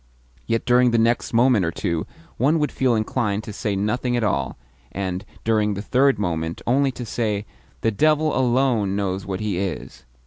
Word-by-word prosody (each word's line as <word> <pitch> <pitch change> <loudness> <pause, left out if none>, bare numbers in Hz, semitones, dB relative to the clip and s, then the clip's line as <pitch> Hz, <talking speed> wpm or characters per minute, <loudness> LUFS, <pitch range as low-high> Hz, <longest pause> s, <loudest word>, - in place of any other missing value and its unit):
yet 115 0 0
during 125 0 +4
the 115 - +2
next 115 +1 +1
moment 120 -3 +4
or 80 - +1
two 85 0 -2 0.3
one 145 +6 +3
would 150 -1 0
feel 130 -3 +1
inclined 110 -1 -1
to 110 - -7
say 105 0 -2
nothing 120 +5 0
at 120 - 0
all, 70 -10 -1 0.3
and, 95 0 -3 0.2
during 105 -2 +1
the 100 - -4
third 135 +1 +3
moment, 85 -4 -2
only 135 +3 +2
to 125 -1 -7
say, 105 -3 -2 0.4
"The 115 - +2
devil 155 +6 +2
alone 120 -5 +2
knows 95 -1 -2
what 95 0 -3
he 105 -4 -1
is!" 95 -4 -5
110 Hz, 180 wpm, -22 LUFS, 100-125 Hz, 0.4 s, during